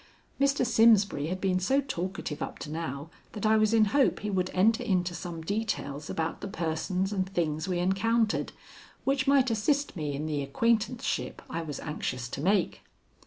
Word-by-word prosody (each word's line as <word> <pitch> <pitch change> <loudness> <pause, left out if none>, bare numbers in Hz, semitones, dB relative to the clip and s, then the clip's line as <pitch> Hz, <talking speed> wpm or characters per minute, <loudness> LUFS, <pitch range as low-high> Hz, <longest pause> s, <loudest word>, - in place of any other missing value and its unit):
Mr. 275 -2 +2
Simsbury 220 -9 +4
had 185 +3 -3
been 185 -1 +1
so 265 +10 +2
talkative 185 - -4
up - - -4
to 150 - -7
now 155 -1 -5 0.2
that 210 -1 -4
I 215 +1 +5
was 215 -1 +3
in 225 -1 +5
hope 280 -2 +3
he 210 0 -2
would 185 -1 0
enter 220 +5 +3
into 180 -2 0
some 170 -2 -6
details 160 -7 -3
about 160 0 -2
the - - -4
persons 185 +1 -2
and 190 -1 -1
things 160 -4 -1
we 180 -2 0
encountered, 215 +5 +1 0.5
which 270 0 +1
might 270 -3 +4
assist 280 +7 0
me 150 -4 -3
in 150 +2 -3
the 150 -2 -1
acquaintanceship 230 - 0
I 165 - -2
was 150 -3 -5
anxious 130 -5 -4
to 135 - -5
make. 190 +3 +1
190 Hz, 175 wpm, -29 LUFS, 160-225 Hz, 0.5 s, I